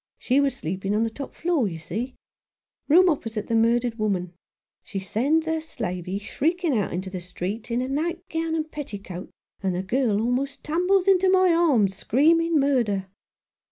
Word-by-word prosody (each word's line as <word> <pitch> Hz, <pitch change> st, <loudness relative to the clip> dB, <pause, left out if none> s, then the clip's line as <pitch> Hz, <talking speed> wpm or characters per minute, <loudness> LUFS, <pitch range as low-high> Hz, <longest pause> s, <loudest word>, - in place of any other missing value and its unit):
She 260 Hz, +2 st, +2 dB
was 280 Hz, -1 st, +1 dB
sleeping 190 Hz, +5 st, -2 dB
on 220 Hz, -, +2 dB
the 225 Hz, -, -1 dB
top 275 Hz, +4 st, -8 dB
floor, 330 Hz, -9 st, +1 dB
you 165 Hz, -4 st, -5 dB
see 230 Hz, +11 st, -5 dB, 0.4 s
— -, -, -62 dB
room 360 Hz, +5 st, +7 dB
opposite 225 Hz, -, -1 dB
the -, -, -3 dB
murdered 230 Hz, +1 st, +2 dB
woman. 185 Hz, -4 st, -1 dB, 0.5 s
She -, -, -7 dB
sends 260 Hz, -, +1 dB
her 320 Hz, 0 st, -1 dB
slavey 180 Hz, -, -4 dB
shrieking 320 Hz, -, 0 dB
out 205 Hz, -4 st, 0 dB
into 185 Hz, +2 st, -4 dB
the 185 Hz, -2 st, -5 dB
street, 185 Hz, +6 st, -5 dB
in 240 Hz, +1 st, 0 dB
a -, -, -3 dB
night 325 Hz, +6 st, -1 dB
gown 325 Hz, -1 st, -2 dB
and 315 Hz, -1 st, -3 dB
petticoat, 200 Hz, -10 st, -7 dB, 0.3 s
and 190 Hz, -2 st, 0 dB
the 180 Hz, -, -2 dB
girl 225 Hz, 0 st, +1 dB
almost 250 Hz, +5 st, -1 dB
tumbles 360 Hz, +4 st, +2 dB
into 380 Hz, -1 st, +5 dB
my 370 Hz, -2 st, +5 dB
arms, 260 Hz, -, +3 dB
screaming 325 Hz, -, +3 dB
murder." 230 Hz, -9 st, +1 dB
245 Hz, 175 wpm, -25 LUFS, 200-320 Hz, 0.5 s, room